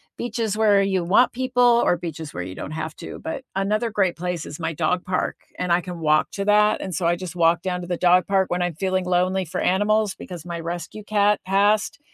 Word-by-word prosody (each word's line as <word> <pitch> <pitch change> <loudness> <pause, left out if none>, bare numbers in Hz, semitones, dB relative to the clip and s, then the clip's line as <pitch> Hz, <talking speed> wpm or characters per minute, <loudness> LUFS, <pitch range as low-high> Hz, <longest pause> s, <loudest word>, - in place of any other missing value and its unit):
beaches 225 -3 -2
where 210 -2 +4
you 195 -2 +1
want 205 +8 +4
people 250 0 0 0.2
or 175 - +2
beaches 160 -3 -7
where 90 - -3
you 90 +1 -7
don't 95 - -7
have 155 0 -5
to. - - -8
But 210 +11 -5
another 210 +4 0
great 195 -5 +1
place 180 -1 -4
is 145 - -8
my 160 -1 -2
dog 175 +3 -1
park, 180 0 -2 0.2
and 180 -1 -2
I 175 - +3
can 180 -1 -7
walk 155 -1 +2
to 200 - -3
that, 210 +1 +3
and 190 - -5
so 170 0 0
I 170 - +3
just 180 0 -7
walk 170 0 +3
down 180 -1 -2
to 175 - -7
the 175 -1 -2
dog 180 0 +4
park 195 -1 +1
when 175 0 0
I'm 175 -2 -1
feeling 185 +1 -1
lonely 180 +1 +1
for 165 - -5
animals 205 +2 +2
because 175 -3 -9
my 170 -1 -5
rescue 170 +5 -6
cat 205 0 +2
passed, 205 +4 +2
185 Hz, 230 wpm, -23 LUFS, 170-205 Hz, 0.2 s, where